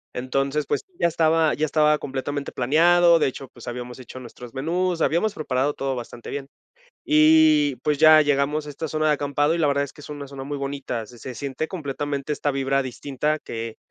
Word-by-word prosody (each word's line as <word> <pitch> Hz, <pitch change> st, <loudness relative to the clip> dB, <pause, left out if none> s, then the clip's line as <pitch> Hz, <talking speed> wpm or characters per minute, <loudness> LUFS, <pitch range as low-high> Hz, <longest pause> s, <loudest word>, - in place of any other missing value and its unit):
Entonces, 135 Hz, +3 st, -1 dB
pues, -, -, 0 dB, 0.2 s
ya 170 Hz, -, +4 dB
estaba 160 Hz, -1 st, +2 dB
ya 155 Hz, -, 0 dB
estaba 150 Hz, 0 st, +3 dB
completamente 140 Hz, +1 st, -4 dB
planeado, 170 Hz, +6 st, +4 dB
de -, -, +2 dB
hecho, 135 Hz, 0 st, -6 dB
pues, 120 Hz, -, -14 dB
habíamos 125 Hz, +1 st, -6 dB
hecho 130 Hz, 0 st, -10 dB
nuestros 125 Hz, 0 st, -11 dB
menús, 170 Hz, +4 st, -1 dB
habíamos 200 Hz, +6 st, +1 dB
preparado 145 Hz, -3 st, -1 dB
todo 135 Hz, -1 st, -3 dB
bastante 120 Hz, -1 st, -8 dB
bien, 140 Hz, -1 st, -5 dB, 0.6 s
y 310 Hz, -1 st, +5 dB
pues, 150 Hz, -1 st, -1 dB
ya 155 Hz, +1 st, +7 dB
llegamos 145 Hz, +1 st, +1 dB
a -, -, -8 dB
esta 155 Hz, +2 st, -5 dB
zona 155 Hz, +1 st, 0 dB
de 150 Hz, -, +4 dB
acampado 145 Hz, +2 st, +1 dB
y -, -, -2 dB
la 155 Hz, -, +2 dB
verdad 140 Hz, 0 st, +1 dB
es 140 Hz, -, -11 dB
que 150 Hz, -, -13 dB
es -, -, -11 dB
una 145 Hz, -2 st, -7 dB
zona 135 Hz, -1 st, -8 dB
muy 145 Hz, 0 st, -4 dB
bonita. 135 Hz, -5 st, -4 dB
Se 120 Hz, -, -14 dB
se 130 Hz, +1 st, -7 dB
siente 140 Hz, +5 st, -4 dB
completamente 145 Hz, -3 st, -3 dB
esta 145 Hz, -, -1 dB
vibra 135 Hz, 0 st, 0 dB
distinta 140 Hz, +4 st, -2 dB
que 115 Hz, -3 st, -6 dB
145 Hz, 205 wpm, -23 LUFS, 135-155 Hz, 0.6 s, ya